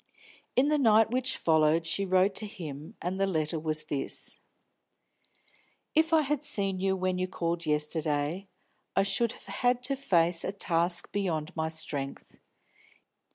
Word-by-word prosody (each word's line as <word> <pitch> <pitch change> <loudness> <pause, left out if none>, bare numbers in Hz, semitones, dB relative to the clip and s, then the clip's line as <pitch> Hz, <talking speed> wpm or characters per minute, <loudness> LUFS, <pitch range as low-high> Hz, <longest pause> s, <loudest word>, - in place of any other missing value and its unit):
In 275 +3 +4
the 300 -1 +2
night 220 -3 +4
which 255 +1 0
followed 160 0 +3
she 195 +5 0
wrote 185 +2 +3
to 215 - -2
him, 155 -7 -8
and 180 +2 -2
the 195 - +2
letter 160 -3 -1
was 155 -1 0
this: 145 -3 -3 1.5
"If 320 +1 +3
I 320 -1 +5
had 295 0 -1
seen 195 -10 0
you 190 0 +1
when 185 -1 -1
you 185 - 0
called 170 -2 -3
yesterday, 150 +3 -1 0.5
I 195 - +4
should 230 +4 +2
have - - -15
had 245 0 0
to 275 +2 0
face 175 -10 +2
a - - -2
task 175 -3 0
beyond 175 -4 -2
my 160 -1 -1
strength. 145 -3 -3
185 Hz, 155 wpm, -29 LUFS, 160-215 Hz, 1.5 s, I